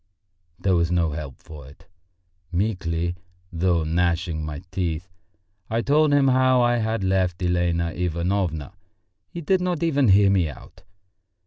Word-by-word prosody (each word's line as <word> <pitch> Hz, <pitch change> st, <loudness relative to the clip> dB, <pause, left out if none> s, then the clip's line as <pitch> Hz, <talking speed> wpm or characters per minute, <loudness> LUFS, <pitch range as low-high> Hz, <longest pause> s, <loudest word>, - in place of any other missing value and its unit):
There 95 Hz, -, 0 dB
was 85 Hz, -1 st, +2 dB
no 85 Hz, -3 st, +1 dB
help 75 Hz, -3 st, -6 dB
for 75 Hz, -4 st, -12 dB
it! 70 Hz, -, -17 dB, 0.7 s
Meekly, 85 Hz, -3 st, -1 dB, 0.4 s
though 85 Hz, -1 st, +1 dB
gnashing 85 Hz, 0 st, 0 dB
my 75 Hz, +2 st, -6 dB
teeth, 90 Hz, -2 st, -3 dB, 0.6 s
I 115 Hz, +1 st, -1 dB
told 150 Hz, +3 st, +3 dB
him 140 Hz, -2 st, +4 dB
how 130 Hz, 0 st, +4 dB
I 120 Hz, 0 st, +2 dB
had 110 Hz, -2 st, -1 dB
left 95 Hz, -1 st, 0 dB
Elena 85 Hz, -1 st, 0 dB
Ivanovna. 90 Hz, -1 st, -2 dB, 0.6 s
He 170 Hz, -, -7 dB
did 185 Hz, +4 st, +1 dB
not 180 Hz, -3 st, -1 dB
even 145 Hz, -5 st, +2 dB
hear 100 Hz, 0 st, +5 dB
me 90 Hz, -5 st, +2 dB
out. 70 Hz, -, -13 dB
90 Hz, 140 wpm, -23 LUFS, 85-115 Hz, 0.7 s, hear